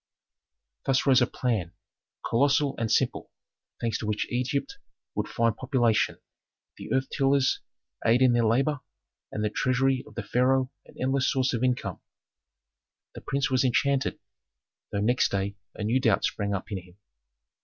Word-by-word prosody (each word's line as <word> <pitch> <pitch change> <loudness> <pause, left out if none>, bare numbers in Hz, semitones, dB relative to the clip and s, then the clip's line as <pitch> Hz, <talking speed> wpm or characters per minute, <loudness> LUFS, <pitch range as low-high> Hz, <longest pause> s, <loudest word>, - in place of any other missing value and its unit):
Thus 135 0 +2
rose 130 -2 +5
a 125 - +4
plan, 105 -9 -2 0.5
colossal 140 +3 +2
and 115 -2 -1
simple, - - +1 0.5
thanks 115 -2 -1
to 110 - -4
which 105 0 0
Egypt 125 +3 -2 0.3
would - - -2
find 115 -1 +1
population, 120 -3 +1 0.6
the - - -9
earth 130 0 +1
tillers 135 -1 +2 0.4
aid 120 +3 +4
in 125 -2 +5
their 120 -1 +3
labor, 135 +6 +2 0.5
and 105 - -3
the 105 - 0
treasury 130 +2 +1
of 110 - -15
the 115 - -3
pharaoh 130 +4 +2 0.2
an - - -17
endless 130 +1 +1
source 130 -2 +1
of 120 0 -1
income. 125 -1 -1 1.1
The - - -9
prince 140 0 -1
was 130 0 +3
enchanted, 135 +2 +1 0.7
though 100 - -1
next 120 +4 +2
day 100 0 -2 0.2
a 105 - -5
new 115 +5 +2
doubt 110 -6 +3
sprang 100 -1 -1
up 95 - -6
in 100 - -2
him. 90 0 -17
125 Hz, 155 wpm, -27 LUFS, 110-135 Hz, 1.1 s, rose